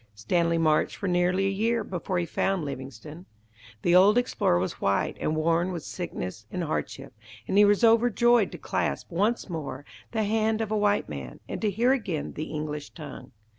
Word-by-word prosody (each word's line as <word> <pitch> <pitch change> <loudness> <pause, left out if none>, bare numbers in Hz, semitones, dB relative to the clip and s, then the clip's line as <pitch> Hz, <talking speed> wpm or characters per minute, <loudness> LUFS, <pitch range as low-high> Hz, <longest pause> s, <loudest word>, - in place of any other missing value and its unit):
Stanley 170 - +1
marched 155 -2 +2
for - - -6
nearly 180 +1 +2
a - - +2
year 225 +3 0
before 185 -1 -3
he 175 - 0
found 190 -1 -1
Livingstone. 140 +5 -8 0.6
The 175 - +3
old 200 +5 +6
explorer 245 - +2
was 90 +2 -3
white 100 0 +1
and 155 - 0
worn 165 +3 +1
with 170 -4 -5
sickness 110 - -6
and 180 - -2
hardship, 140 -3 -4 0.3
and - - -1
he 205 +1 +7
was 205 +3 +3
overjoyed 235 -1 +4
to - - -6
clasp - - -2
once 205 +7 0
more 145 -5 -5 0.3
the 220 -1 0
hand 220 +1 +1
of 220 -2 -2
a - - +1
white 205 0 +2
man, 70 -4 -7
and - - -5
to 215 - +2
hear 235 +6 +2
again 190 - -3
the 155 - -4
English 150 -1 -5
tongue. 140 -5 -9
180 Hz, 185 wpm, -27 LUFS, 155-210 Hz, 0.6 s, he